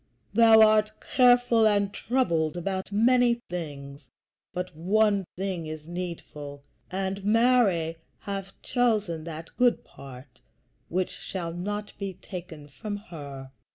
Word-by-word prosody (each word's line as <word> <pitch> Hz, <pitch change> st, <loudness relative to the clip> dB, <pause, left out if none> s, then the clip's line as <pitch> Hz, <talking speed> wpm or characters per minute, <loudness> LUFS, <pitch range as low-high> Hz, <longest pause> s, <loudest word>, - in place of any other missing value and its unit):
thou 225 Hz, 0 st, +7 dB
art 215 Hz, 0 st, +3 dB
careful 245 Hz, -3 st, +4 dB
and 205 Hz, -1 st, +2 dB
troubled 170 Hz, -, 0 dB
about 190 Hz, +2 st, -3 dB
many 240 Hz, +3 st, +4 dB, 0.2 s
things, 140 Hz, -5 st, -7 dB, 0.4 s
but 180 Hz, -2 st, -5 dB
one 200 Hz, +4 st, +2 dB
thing 185 Hz, -3 st, -3 dB
is 155 Hz, -1 st, -7 dB
needful, 160 Hz, -5 st, -7 dB, 0.3 s
and 195 Hz, +1 st, -3 dB
Mary 210 Hz, -7 st, +3 dB, 0.2 s
hath 195 Hz, -2 st, -5 dB
chosen 215 Hz, -10 st, 0 dB
that 165 Hz, 0 st, -7 dB
good 245 Hz, -1 st, +3 dB
part 130 Hz, -2 st, -13 dB, 0.5 s
which 185 Hz, +1 st, -1 dB
shall 170 Hz, -3 st, -5 dB
not 205 Hz, +4 st, -4 dB
be 195 Hz, -2 st, -4 dB
taken 170 Hz, -6 st, -9 dB
from 205 Hz, +8 st, -6 dB
her." 140 Hz, -9 st, -9 dB
190 Hz, 120 wpm, -27 LUFS, 160-215 Hz, 0.5 s, thou